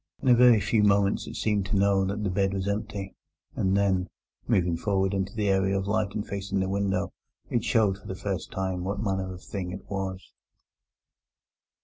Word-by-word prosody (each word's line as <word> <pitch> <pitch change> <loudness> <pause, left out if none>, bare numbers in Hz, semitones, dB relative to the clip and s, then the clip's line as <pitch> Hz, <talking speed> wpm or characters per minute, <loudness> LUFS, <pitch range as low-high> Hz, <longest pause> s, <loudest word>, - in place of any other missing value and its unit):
In - - -4
a - - +8
very 120 -2 +7
few 105 +2 +2
moments 100 -1 +3
it 115 - -7
seemed 105 -4 0
to 100 - -1
know 100 0 +3
that 100 +2 -2
the 100 - 0
bed 95 +1 +1
was 95 0 -2
empty, 100 -1 -3 0.4
and 95 +1 +1
then, 95 -2 +2 0.4
moving 90 -2 +2
forward 95 +2 0
into 95 0 -1
the 105 -2 0
area 95 0 +2
of 95 - -2
light 105 0 0
and 105 - -2
facing 100 0 -3
the 95 - 0
window, 100 0 -1 0.4
it 120 -2 +1
showed 105 -4 +2
for - - -14
the 95 - -4
first 95 -1 -4
time 95 -2 -2
what 100 +4 -2
manner 95 -2 -1
of 90 0 -9
thing 95 -3 -5
it 95 +2 -8
was. 95 -1 -5
100 Hz, 200 wpm, -27 LUFS, 95-105 Hz, 0.4 s, a